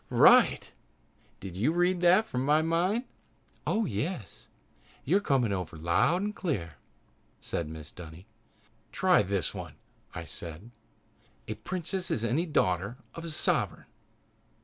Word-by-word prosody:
"Right! - - +5 0.7
Did 95 -2 -8
you 115 +11 +2
read 175 +1 +1
that 180 +5 +5
from 125 -11 -2
my 150 +3 +3
mind?" 175 +8 +1 0.6
"Oh, 220 0 +1
yes, 115 - -4 0.6
you're 180 +9 +3
coming 130 - +1
over 90 -4 -4
very 130 - +2
clear!" 115 - -3 0.6
said 85 - -3
Mrs. 80 -1 -9
Dunny. 85 +1 -11 0.7
"Try 185 -2 +4
this 95 -5 -1
one," - - -7 0.4
I 85 - -5
said. 85 +8 -8 0.8
"A - - -2
princess 185 0 -3
is 115 - -1
any 145 +10 0
daughter 100 - 0 0.2
of 165 - -8
a - - -4
sovereign. 155 - 0
130 Hz, 125 wpm, -29 LUFS, -, 0.8 s, Right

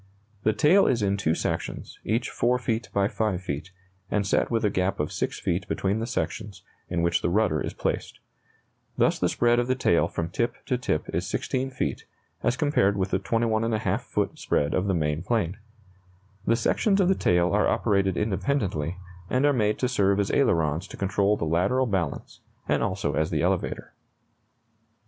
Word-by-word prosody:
The 110 - +3
tail 180 - +5
is 120 -4 +1
in 100 0 +2
two 85 -5 0
sections, - - -4
each 115 +3 -1
4 125 +1 +2
feet 120 -2 -2
by 100 0 +2
5 105 -4 -1
feet, 85 -1 -5 0.4
and 105 -1 0
set 95 - +1
with 115 -2 0
a 105 - +2
gap 95 0 0
of 75 - -1
6 - - -2
feet 90 +1 -1
between 100 +3 -1
the 115 - -3
sections, 105 -5 -4 0.3
in 85 -2 0
which 85 0 +2
the - - 0
rudder 90 -6 +2
is - - -4
placed. - - -3 0.8
Thus - - +2
the - - +2
spread 120 0 +3
of 120 - 0
the 130 - +1
tail 85 -10 +2
from 85 0 -3
tip 120 +7 -1
to 125 - 0
tip 80 -10 -2
is 85 +2 -1
16 130 +3 -2
feet, 130 - -3 0.4
as 120 - +1
compared 115 -9 +2
with 95 0 -1
the - - +2
21½ 110 +1 0
foot - - -2
spread 70 - 0
of 95 +2 0
the 95 - +1
main 75 -1 0
plane. 95 -2 -1 0.9
The 115 - +4
sections 195 - +2
of 190 - +4
the 190 - +5
tail 90 - +2
are - - +3
operated 100 -3 +1
independently, 95 - -1 0.3
and 130 +3 +2
are 145 - +4
made 105 -4 +1
to 125 - 0
serve 100 -5 +2
as 100 - 0
ailerons 85 - +1
to - - -10
control 100 +1 +1
the - - -2
lateral 95 +11 +2
balance, 95 - -3 0.3
and - - +1
also 95 -6 -1
as 80 +3 0
the 80 -5 0
elevator. - - -1
100 Hz, 185 wpm, -26 LUFS, 90-120 Hz, 0.9 s, tail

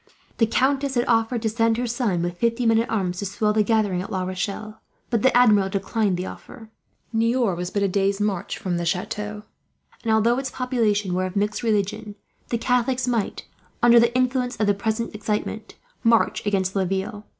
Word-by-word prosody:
The 225 - +4
countess 270 +3 +1
had 240 0 +2
offered 225 0 +1
to 220 - +1
send 225 0 +1
her 245 - -1
son, 225 -7 -1
with 175 0 -4
fifty 235 +1 +1
men 225 0 +4
at 230 - -1
arms, 185 -5 -1
to 200 - -3
swell 210 +2 0
the 215 - +3
gathering 210 -4 +1
at 190 - -7
La 185 -1 -1
Rochelle; 200 +4 -4 0.3
but 230 -3 +1
the 260 0 +4
Admiral 210 -6 +5
declined 195 0 0
the 180 - -3
offer. 225 0 -11 0.4
Niort 230 -3 +1
was 180 +1 -4
but 200 +1 -1
a - - +3
day's 195 +1 0
march 205 -4 -2
from 180 -2 -2
the 170 - -2
chateau 210 +3 -3 0.6
and, 225 - 0
although 230 +3 +3
its 270 - -3
population 220 -7 0
were 185 +1 0
of 185 - -9
mixed 205 +1 0
religion, 210 -1 -1 0.3
the 235 - 0
Catholics 250 +2 0
might, 235 -4 -1 0.4
under 240 0 +7
the 235 +1 +2
influence 255 0 0
of 215 - +2
the 205 - +3
present 220 +3 -2
excitement, 210 +1 -4 0.3
march 230 -1 +3
against 190 -2 0
Laville. 195 +2 -2
215 Hz, 195 wpm, -23 LUFS, 195-235 Hz, 0.6 s, under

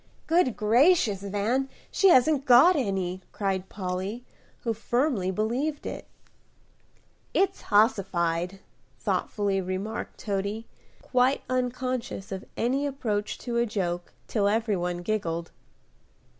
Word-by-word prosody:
"Good 325 -8 +2
gracious, 235 - +4
Van, 210 +7 -1 0.2
she 390 - +4
hasn't 280 -1 +4
got 265 +9 +8
any," 190 - -1
cried 190 -2 -2
Polly, 190 +4 -4 0.4
who 230 - -1
firmly 240 -3 0
believed 245 +10 -1
it. - - -6 1.3
"It's 390 - +2
hossified," 190 -4 +1 0.4
thoughtfully 200 -2 -1
remarked 190 +4 -4
Toady, 200 +2 -3 0.4
quite 255 +2 +2
unconscious 255 -4 -2
of 190 0 -5
any 270 +5 +1
approach 220 -7 -2
to 240 -2 -1
a 235 0 +2
joke 175 -5 -3 0.2
till 205 -3 +1
every 220 0 +1
one 175 -1 -2
giggled. 170 -5 -2
215 Hz, 110 wpm, -27 LUFS, 190-255 Hz, 1.3 s, got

